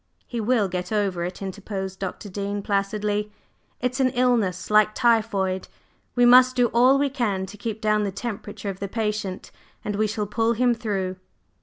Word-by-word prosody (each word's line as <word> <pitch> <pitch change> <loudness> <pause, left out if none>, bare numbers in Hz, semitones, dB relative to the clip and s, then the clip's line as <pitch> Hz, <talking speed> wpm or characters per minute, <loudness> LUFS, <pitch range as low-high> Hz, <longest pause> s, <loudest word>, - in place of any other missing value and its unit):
"He 235 -2 -4
will 220 -2 +2
get 180 +1 -4
over 195 -5 0
it," 180 +2 -6
interposed 190 -1 -5
Dr. 195 +2 -5
Dean 200 +1 -4
placidly. 205 +1 -1 0.5
"It's 250 +2 -2
an 260 -1 +4
illness, 220 -8 +1
like 215 0 +4
typhoid, 215 -6 +1 0.5
we 245 -1 +5
must 255 +1 +7
do 245 -1 +3
all 250 +4 +5
we 285 +1 +2
can 210 -8 -1
to 190 - -11
keep 215 +1 -5
down 215 -1 +2
the 200 - -1
temperature 205 0 -5
of 190 - -11
the 200 - -3
patient, 210 -3 -3 0.3
and 205 - -2
we 215 +1 +1
shall 210 0 -2
pull 225 +3 +1
him 245 +1 +3
through." 195 -5 -3
210 Hz, 175 wpm, -24 LUFS, 195-235 Hz, 0.5 s, must